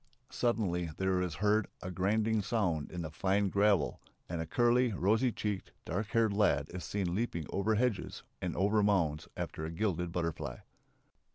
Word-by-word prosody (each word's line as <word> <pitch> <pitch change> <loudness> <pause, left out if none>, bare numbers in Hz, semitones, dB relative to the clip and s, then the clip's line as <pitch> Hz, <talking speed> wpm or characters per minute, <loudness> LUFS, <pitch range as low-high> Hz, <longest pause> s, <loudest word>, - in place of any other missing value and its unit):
Suddenly 95 -8 0
there 95 -1 +1
is 90 -3 -2
heard 105 +2 +2 0.2
a 90 - -4
grinding 105 +4 +1
sound 95 -9 0
in 90 -1 -4
the 80 - -5
fine 95 +5 +1
gravel 100 -5 +2 0.3
and 85 -1 -3
a 80 - -4
curly, 120 +4 +3
rosy 110 +7 +2
cheeked, 105 -3 -3
dark 105 0 -2
haired 115 -2 +2
lad 90 -9 +2
is 90 -2 -5
seen 90 +1 -2
leaping 95 -6 -1
over 105 +3 +1
hedges 115 -2 -1 0.2
and 90 -2 -2
over 105 +3 +3
mounds 85 -8 +1
after 80 - -4
a 80 - -3
gilded 90 -1 -1
butterfly.... 85 -2 -3
100 Hz, 165 wpm, -32 LUFS, 85-110 Hz, 0.3 s, curly